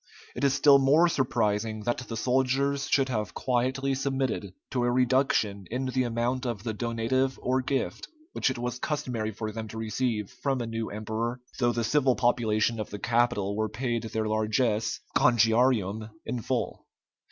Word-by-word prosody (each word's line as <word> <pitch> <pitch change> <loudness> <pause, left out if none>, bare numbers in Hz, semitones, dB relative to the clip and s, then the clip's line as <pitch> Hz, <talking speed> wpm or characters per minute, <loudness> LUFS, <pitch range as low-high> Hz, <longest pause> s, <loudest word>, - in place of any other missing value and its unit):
It - - -4
is 135 -1 +3
still 140 0 +6
more 145 +6 +5
surprising 110 -7 0
that 120 +2 0
the 120 -3 -6
soldiers 135 +3 +1
should 135 -2 +3
have 110 -4 -2
quietly 130 +2 0
submitted 130 -8 -2 0.2
to 125 -3 0
a 120 - +2
reduction 120 -6 +1
in 130 +3 -2
the 130 0 0
amount 120 +2 -1
of 110 -4 -4
the 115 -2 -2
donative 120 +4 0
or 130 +1 +1
gift 135 +1 -2 0.3
which - - +1
it 130 - -3
was 125 +1 -3
customary 125 -8 -2
for 110 0 -5
them 110 0 -5
to 110 - -8
receive 110 -1 -2
from 135 -2 -2
a 120 - -2
new 115 0 -3
emperor, 110 +3 -3 0.2
though 120 -1 +3
the 120 0 -1
civil 130 +2 +3
population 115 -2 +1
of 105 - -4
the 105 - -6
capital 115 -3 +1
were 110 0 -1
paid 120 +2 -2
their 110 0 -2
largess 110 +1 0 0.2
(congiarium) 115 -2 +3 0.2
in 120 0 -3
full. - - -3
120 Hz, 170 wpm, -28 LUFS, 110-130 Hz, 0.3 s, still